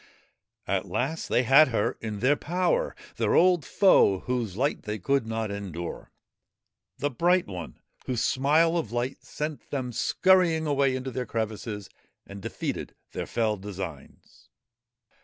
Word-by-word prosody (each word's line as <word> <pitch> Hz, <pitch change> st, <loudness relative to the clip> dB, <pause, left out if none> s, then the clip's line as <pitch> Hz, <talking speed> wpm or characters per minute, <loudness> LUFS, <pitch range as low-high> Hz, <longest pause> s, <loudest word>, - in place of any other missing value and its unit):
At -, -, -1 dB
last 160 Hz, +6 st, -2 dB
they 125 Hz, -, +3 dB
had 135 Hz, +6 st, +7 dB
her 115 Hz, -5 st, 0 dB
in 110 Hz, -2 st, -5 dB
their 135 Hz, +4 st, +4 dB
power 185 Hz, -, 0 dB, 0.2 s
their -, -, +1 dB
old 180 Hz, -3 st, +5 dB
foe 115 Hz, -, +4 dB
whose 115 Hz, -6 st, -2 dB
light 140 Hz, +4 st, 0 dB
they 105 Hz, 0 st, -4 dB
could 135 Hz, +4 st, 0 dB
not 110 Hz, -2 st, -2 dB
endure; 90 Hz, -4 st, -6 dB, 0.9 s
the 145 Hz, -, -1 dB
Bright 175 Hz, +7 st, +2 dB
One 90 Hz, -4 st, -7 dB, 0.3 s
whose 125 Hz, -3 st, 0 dB
smile 155 Hz, +6 st, +3 dB
of 115 Hz, -10 st, -5 dB
light 120 Hz, +2 st, -3 dB
sent 150 Hz, 0 st, -5 dB
them 130 Hz, -3 st, -3 dB
scurrying 170 Hz, +4 st, +3 dB
away 140 Hz, -3 st, +2 dB
into 130 Hz, 0 st, -4 dB
their 125 Hz, +1 st, -4 dB
crevices 110 Hz, -2 st, -4 dB, 0.4 s
and 100 Hz, 0 st, -10 dB
defeated -, -, -4 dB, 0.2 s
their -, -, -4 dB
fell 110 Hz, -2 st, 0 dB
designs. 95 Hz, -7 st, -9 dB
125 Hz, 140 wpm, -27 LUFS, 105-150 Hz, 0.9 s, had